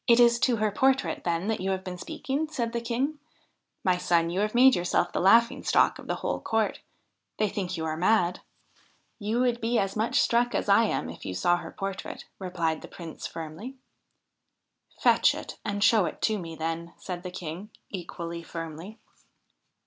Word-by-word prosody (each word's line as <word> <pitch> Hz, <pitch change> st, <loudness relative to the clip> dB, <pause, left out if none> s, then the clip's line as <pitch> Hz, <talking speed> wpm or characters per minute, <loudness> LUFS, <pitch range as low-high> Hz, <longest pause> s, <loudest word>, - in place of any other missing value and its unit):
' -, -, -53 dB
It 235 Hz, -1 st, +6 dB
is 235 Hz, 0 st, +6 dB
to 250 Hz, -1 st, +3 dB
her 215 Hz, -1 st, +1 dB
portrait, 265 Hz, +5 st, +1 dB
then, 170 Hz, +2 st, 0 dB
that 220 Hz, -, -1 dB
you 190 Hz, -, -1 dB
have 190 Hz, -1 st, -1 dB
been 180 Hz, -1 st, -6 dB
speaking? 305 Hz, -, -3 dB
' -, -, -23 dB
said 235 Hz, -6 st, -2 dB
the 235 Hz, -, -1 dB
King. 255 Hz, +6 st, -1 dB, 0.3 s
' -, -, -43 dB, 0.3 s
My 185 Hz, -1 st, +3 dB
son, 170 Hz, -1 st, +2 dB
you 180 Hz, -, -1 dB
have 210 Hz, +2 st, 0 dB
made 260 Hz, +2 st, +7 dB
yourself 175 Hz, 0 st, +1 dB
the -, -, 0 dB
laughing 230 Hz, +5 st, +5 dB
stock -, -, +3 dB
of -, -, -11 dB
the -, -, 0 dB
whole -, -, -3 dB
court. 220 Hz, -1 st, 0 dB, 0.6 s
They 215 Hz, -, +2 dB
think 190 Hz, -3 st, -3 dB
you 160 Hz, -, -2 dB
are 155 Hz, -1 st, -1 dB
mad.' 180 Hz, 0 st, +2 dB, 0.4 s
' -, -, -33 dB, 0.3 s
You 220 Hz, +3 st, 0 dB
would 245 Hz, -1 st, +1 dB
be 230 Hz, +1 st, +1 dB
as 195 Hz, -2 st, 0 dB
much 235 Hz, +5 st, +1 dB
struck 240 Hz, +1 st, +2 dB
as -, -, -1 dB
I 205 Hz, +3 st, +5 dB
am 80 Hz, -, -1 dB
if 80 Hz, +1 st, -9 dB
you 95 Hz, -1 st, -4 dB
saw 175 Hz, -, +3 dB
her 175 Hz, -, -7 dB
portrait,' 195 Hz, -1 st, -5 dB
replied 170 Hz, -4 st, -1 dB
the -, -, -9 dB
Prince 165 Hz, -3 st, -8 dB
firmly. 165 Hz, +11 st, -7 dB, 0.6 s
' -, -, -39 dB
Fetch -, -, +5 dB
it -, -, -8 dB
and 205 Hz, -1 st, -1 dB
show 215 Hz, -4 st, +5 dB
it -, -, -6 dB
to 215 Hz, -2 st, +2 dB
me, 165 Hz, -2 st, -7 dB
then,' 165 Hz, +1 st, -4 dB
said 180 Hz, -2 st, -6 dB
the 180 Hz, -, -6 dB
King, 180 Hz, +2 st, -7 dB, 0.2 s
equally 170 Hz, -2 st, -5 dB
firmly. 165 Hz, +5 st, -7 dB
195 Hz, 205 wpm, -27 LUFS, 170-235 Hz, 0.6 s, made